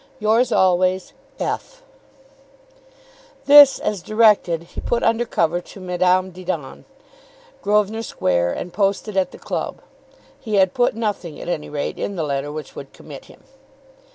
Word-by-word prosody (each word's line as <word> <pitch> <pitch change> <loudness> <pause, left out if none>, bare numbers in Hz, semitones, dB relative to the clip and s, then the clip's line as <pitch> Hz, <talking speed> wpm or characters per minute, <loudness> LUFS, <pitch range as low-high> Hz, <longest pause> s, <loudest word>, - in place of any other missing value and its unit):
Yours 225 +3 +2
always, 185 -1 +2 0.3
F. - - -4 1.6
This, 285 -1 +8
as 205 -4 -3
directed, 210 -5 +3
he 170 - -9
put 240 - -1
under 230 +1 +2
cover 175 -5 0
to 195 - -14
Madame 185 0 +1
Didon, 175 -6 -6 0.8
Grosvenor 210 +2 +1
Square, 85 - 0
and 175 - -6
posted 200 +1 -1
at 190 -1 +1
the - - -13
club. - - -4 0.6
He 220 -5 -3
had 190 -2 +3
put 245 -3 +1
nothing 205 -8 -4
at - - -7
any 155 -4 -3
rate 145 -1 -4
in 200 - -3
the 165 - -2
letter 140 0 -3
which 150 -2 -8
could 135 - -10
commit 145 -3 -12
him. - - -18
185 Hz, 145 wpm, -21 LUFS, 170-215 Hz, 1.6 s, This